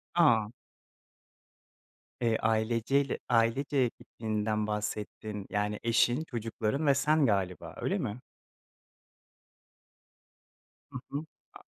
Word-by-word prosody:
A! 115 Hz, -11 st, +5 dB, 1.7 s
Eee, 115 Hz, -2 st, +2 dB
aileceyle 115 Hz, +5 st, +1 dB
ailece 120 Hz, +3 st, +2 dB
gittiğinden 110 Hz, -1 st, -2 dB
bahsettin. 105 Hz, -1 st, -4 dB
Yani, 105 Hz, 0 st, -1 dB
eşin, 120 Hz, +4 st, +3 dB
çocukların 115 Hz, +1 st, -2 dB
ve 140 Hz, -, +7 dB
sen 150 Hz, +1 st, +3 dB
galiba, 95 Hz, -5 st, -1 dB
öyle -, -, 0 dB
mi? 105 Hz, +4 st, -3 dB, 2.7 s
Hı 130 Hz, -, -5 dB
hı. 145 Hz, +3 st, -3 dB, 0.3 s
A -, -, -12 dB
115 Hz, 85 wpm, -30 LUFS, 105-135 Hz, 2.7 s, ve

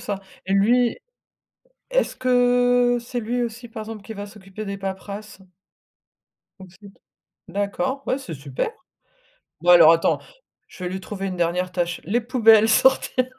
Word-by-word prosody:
ça, 200 Hz, -1 st, -4 dB, 0.3 s
et 195 Hz, -, 0 dB
lui, 235 Hz, +4 st, +3 dB, 0.9 s
est-ce -, -, +1 dB
que 245 Hz, -1 st, +3 dB
c'est 240 Hz, +1 st, -5 dB
lui 240 Hz, +2 st, -2 dB
aussi, 235 Hz, +1 st, -6 dB
par 225 Hz, -1 st, -7 dB
exemple, 215 Hz, -1 st, -8 dB
qui 220 Hz, -, -8 dB
va 205 Hz, -1 st, -7 dB
s'occuper 200 Hz, 0 st, -10 dB
des 200 Hz, 0 st, -4 dB
paperasses? 200 Hz, +1 st, -7 dB, 1.2 s
Aussi. 190 Hz, +2 st, -14 dB, 0.6 s
D'accord, 265 Hz, +8 st, -2 dB
ouais, 260 Hz, -, +1 dB
c'est 230 Hz, -12 st, -8 dB
super. 140 Hz, -, -4 dB, 0.9 s
Bon 175 Hz, +1 st, +2 dB
alors, 165 Hz, -2 st, +9 dB
attends, 165 Hz, -, +1 dB, 0.5 s
je 185 Hz, -, -10 dB
vais 180 Hz, -, -3 dB
lui 190 Hz, -, -5 dB
trouver 195 Hz, 0 st, -6 dB
une 185 Hz, -, -4 dB
dernière 180 Hz, +1 st, -1 dB
tâche. 175 Hz, -1 st, -2 dB
Les 225 Hz, +8 st, 0 dB
poubelles, 225 Hz, -3 st, +5 dB
sortir 255 Hz, +2 st, +3 dB
210 Hz, 150 wpm, -22 LUFS, 190-245 Hz, 1.2 s, alors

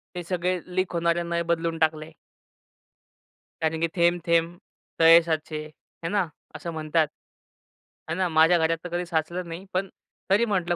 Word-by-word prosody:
हे 175 Hz, -, -4 dB
सगळे 180 Hz, +1 st, -1 dB, 0.2 s
लीक 185 Hz, -1 st, 0 dB
होणारे 170 Hz, 0 st, +1 dB
नळ 170 Hz, 0 st, -1 dB
बदलून 165 Hz, -1 st, 0 dB
टाकले. 155 Hz, 0 st, 0 dB, 1.5 s
कारण 160 Hz, 0 st, 0 dB
की 165 Hz, -, +2 dB
थेंब-थेंब 170 Hz, 0 st, +2 dB, 0.4 s
तळे 165 Hz, +1 st, +8 dB
साचे, 155 Hz, -1 st, -3 dB
आहे 155 Hz, +2 st, -11 dB
ना 200 Hz, -4 st, +1 dB, 0.3 s
असं 165 Hz, +2 st, -5 dB
म्हणतात. 155 Hz, 0 st, +1 dB, 1.0 s
आहे 160 Hz, -, -2 dB
ना, 185 Hz, -1 st, +1 dB
माझ्या 160 Hz, +2 st, +5 dB
घरात 165 Hz, 0 st, +1 dB
तर 180 Hz, -, -6 dB
कधी 175 Hz, +1 st, -2 dB
साचलं 170 Hz, +2 st, -2 dB
नाही 170 Hz, +3 st, -7 dB
पण 190 Hz, +1 st, -1 dB, 0.4 s
तरी 210 Hz, +5 st, +4 dB
म्हटलं 180 Hz, -5 st, 0 dB
170 Hz, 150 wpm, -25 LUFS, 160-175 Hz, 1.5 s, तळे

